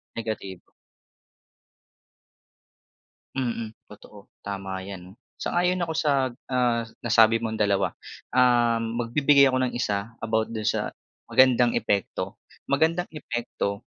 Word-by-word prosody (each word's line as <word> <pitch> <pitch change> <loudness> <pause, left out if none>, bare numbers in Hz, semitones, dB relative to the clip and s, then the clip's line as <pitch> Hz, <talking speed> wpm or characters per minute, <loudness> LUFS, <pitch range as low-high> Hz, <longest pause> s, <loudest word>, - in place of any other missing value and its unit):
Negatibo. 105 -5 -6 2.6
Mm, 115 -4 -3 0.2
totoo 105 -1 -15
tama 95 -1 -5
yan. 95 -1 -9 0.2
Sang-ayon 180 +1 0
ako 165 - -2
sa, 140 -5 +1 0.2
ah, 120 -3 +1 0.2
nasabi 115 -1 +4
mong 110 -1 -3
dalawa. 100 -2 +2 0.4
Um, 120 -2 +3
magbibigay 140 +2 +4
ako 130 - +1
ng 130 -2 -1
isa 105 -1 -2
about 110 0 +1
dun 110 - -3
sa 105 - 0 0.4
magandang 125 -2 +4
epekto, 100 -1 -1 0.3
magandang 165 +5 +1
epekto 120 -7 -4
115 Hz, 105 wpm, -25 LUFS, 105-130 Hz, 2.6 s, nasabi